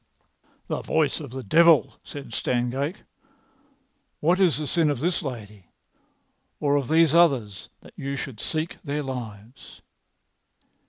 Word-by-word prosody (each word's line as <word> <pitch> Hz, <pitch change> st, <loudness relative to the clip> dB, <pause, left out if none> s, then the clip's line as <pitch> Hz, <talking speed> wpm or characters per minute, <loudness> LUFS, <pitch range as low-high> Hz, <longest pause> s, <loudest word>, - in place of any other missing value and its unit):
"The -, -, -3 dB
voice 155 Hz, -2 st, 0 dB
of 145 Hz, -4 st, -8 dB
the 130 Hz, +1 st, -7 dB
devil," 160 Hz, +3 st, +5 dB
said 145 Hz, -1 st, -9 dB
Stangate. 130 Hz, +7 st, -2 dB, 1.2 s
"What 175 Hz, +5 st, +2 dB
is 180 Hz, -5 st, +3 dB
the 155 Hz, -, -3 dB
sin 160 Hz, +1 st, +2 dB
of 145 Hz, -4 st, -1 dB
this 170 Hz, +5 st, 0 dB
lady, 105 Hz, -, -8 dB, 0.9 s
or 145 Hz, -1 st, +2 dB
of 140 Hz, -3 st, 0 dB
these 160 Hz, -1 st, +4 dB
others, 130 Hz, -, +2 dB
that -, -, -16 dB
you 140 Hz, +1 st, -4 dB
should 135 Hz, -5 st, -6 dB
seek 155 Hz, +6 st, -3 dB
their 145 Hz, 0 st, -2 dB
lives?" 120 Hz, -3 st, -8 dB
140 Hz, 130 wpm, -25 LUFS, 125-160 Hz, 1.2 s, devil